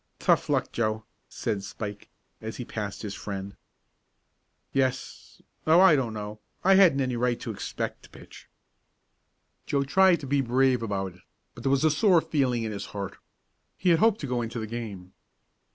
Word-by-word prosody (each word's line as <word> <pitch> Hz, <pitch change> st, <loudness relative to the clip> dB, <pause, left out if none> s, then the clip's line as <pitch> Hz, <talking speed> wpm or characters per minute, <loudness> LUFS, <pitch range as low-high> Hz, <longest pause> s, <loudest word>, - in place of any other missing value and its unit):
"Tough -, -, +2 dB
luck, -, -, +1 dB
Joe," 110 Hz, -1 st, -1 dB, 0.2 s
said 100 Hz, -, -3 dB
Spike, 105 Hz, +1 st, -7 dB, 0.3 s
as 110 Hz, +1 st, -6 dB
he 125 Hz, -, -5 dB
passed 105 Hz, -2 st, -5 dB
his 100 Hz, -2 st, -4 dB
friend. 100 Hz, -1 st, -6 dB, 1.2 s
"Yes 130 Hz, -1 st, -2 dB, 0.2 s
Oh, 160 Hz, +2 st, +6 dB
I 190 Hz, -4 st, +7 dB
don't 120 Hz, -5 st, -1 dB
know! 105 Hz, 0 st, -6 dB, 0.2 s
I 195 Hz, -, +6 dB
hadn't 185 Hz, -8 st, +6 dB
any 130 Hz, -2 st, -1 dB
right 120 Hz, 0 st, 0 dB
to -, -, -5 dB
expect -, -, -4 dB
to -, -, -17 dB
pitch!" -, -, -14 dB, 1.2 s
Joe 140 Hz, -1 st, +1 dB
tried 185 Hz, +5 st, +4 dB
to -, -, -6 dB
be 140 Hz, +1 st, +1 dB
brave 130 Hz, 0 st, +2 dB
about 95 Hz, -4 st, -3 dB
it, 90 Hz, -, -20 dB, 0.3 s
but 115 Hz, -, -11 dB
there 135 Hz, -, +1 dB
was 140 Hz, +2 st, +2 dB
a 155 Hz, -, +5 dB
sore 175 Hz, +3 st, +4 dB
feeling 130 Hz, -7 st, 0 dB
in 110 Hz, -, -3 dB
his 100 Hz, -1 st, -5 dB
heart. 100 Hz, -1 st, -5 dB, 0.6 s
He 180 Hz, -, +1 dB
had 165 Hz, -2 st, +5 dB
hoped 225 Hz, +1 st, +4 dB
to -, -, -3 dB
go 125 Hz, -1 st, -1 dB
into 115 Hz, +1 st, -5 dB
the 110 Hz, -, -3 dB
game. 105 Hz, -5 st, -7 dB
120 Hz, 180 wpm, -27 LUFS, 105-140 Hz, 1.2 s, I